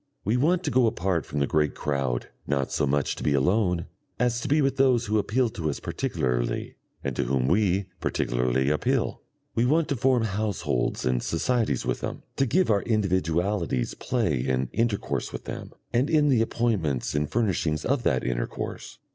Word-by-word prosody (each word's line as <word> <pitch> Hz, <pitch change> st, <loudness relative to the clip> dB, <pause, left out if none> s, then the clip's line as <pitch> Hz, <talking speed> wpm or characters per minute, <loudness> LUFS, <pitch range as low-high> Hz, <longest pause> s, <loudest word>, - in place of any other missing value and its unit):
We 110 Hz, +4 st, +2 dB
want 170 Hz, +8 st, +2 dB
to 150 Hz, -, -1 dB
go 130 Hz, -2 st, +4 dB
apart 90 Hz, -6 st, -1 dB
from 75 Hz, -, -2 dB
the -, -, +3 dB
great 75 Hz, +1 st, +1 dB
crowd, 70 Hz, -4 st, -1 dB, 0.2 s
not 70 Hz, -2 st, 0 dB
so 70 Hz, -, +1 dB
much 70 Hz, 0 st, +1 dB
to -, -, -7 dB
be 75 Hz, -, +2 dB
alone 90 Hz, +3 st, +2 dB, 0.3 s
as 120 Hz, 0 st, +1 dB
to -, -, -3 dB
be 150 Hz, +2 st, +3 dB
with 135 Hz, -2 st, +1 dB
those 130 Hz, -3 st, +4 dB
who 105 Hz, +1 st, +1 dB
appeal 120 Hz, +5 st, +1 dB
to 80 Hz, -7 st, -3 dB
us 75 Hz, -, -3 dB
particularly -, -, -2 dB, 0.3 s
and 65 Hz, -2 st, -2 dB
to -, -, 0 dB
whom 65 Hz, 0 st, +1 dB
we 95 Hz, +2 st, +2 dB
particularly 65 Hz, +3 st, 0 dB
appeal; 75 Hz, -, 0 dB, 0.3 s
we 115 Hz, -, +2 dB
want 150 Hz, +6 st, +3 dB
to 140 Hz, -, +1 dB
form 125 Hz, -1 st, +2 dB
households 100 Hz, -, -1 dB
and 65 Hz, -1 st, +1 dB
societies 115 Hz, +8 st, 0 dB
with -, -, -1 dB
them, -, -, -5 dB
to 135 Hz, -, +2 dB
give 175 Hz, +4 st, +2 dB
our 100 Hz, -1 st, +3 dB
individualities 95 Hz, -, 0 dB
play 110 Hz, -, 0 dB
in 65 Hz, 0 st, 0 dB
intercourse 115 Hz, -3 st, -1 dB
with -, -, -6 dB
them, -, -, -6 dB, 0.2 s
and 125 Hz, +4 st, +2 dB
in 150 Hz, -2 st, +4 dB
the 125 Hz, -5 st, +4 dB
appointments 105 Hz, -, 0 dB
and 75 Hz, 0 st, 0 dB
furnishings 90 Hz, -9 st, 0 dB
of 140 Hz, -1 st, +1 dB
that 65 Hz, -, +1 dB
intercourse. -, -, -4 dB
95 Hz, 180 wpm, -26 LUFS, -, 0.3 s, go